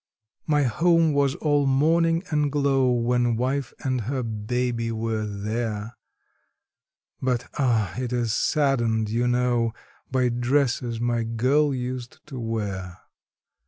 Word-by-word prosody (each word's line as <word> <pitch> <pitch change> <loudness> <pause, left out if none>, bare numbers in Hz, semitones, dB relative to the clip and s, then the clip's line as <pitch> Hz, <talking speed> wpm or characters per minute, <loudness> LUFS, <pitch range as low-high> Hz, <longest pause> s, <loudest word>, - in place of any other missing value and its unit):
My 150 -2 +3
home 165 +6 +3
was 140 -1 +2
all 145 -2 +1
morning 165 +5 +3
and 150 -2 +1
glow 135 -3 +2
when 120 0 +1
wife 130 +2 -1
and 130 -2 0
her 130 +4 -2
baby 115 +1 -2
were 110 -1 -2
there, 105 +2 -3 1.3
But, 125 -2 -1
ah! 115 -9 +1
it 125 -1 -3
is 120 -3 0
saddened, 120 -7 +1
you 120 +2 +1
know, 120 -2 +1 0.4
by 130 -1 +2
dresses 120 -1 0
my 120 0 0
girl 130 +6 +2
used 125 -1 -4
to 130 -3 -6
wear. 100 -6 -4
125 Hz, 125 wpm, -25 LUFS, 115-135 Hz, 1.3 s, My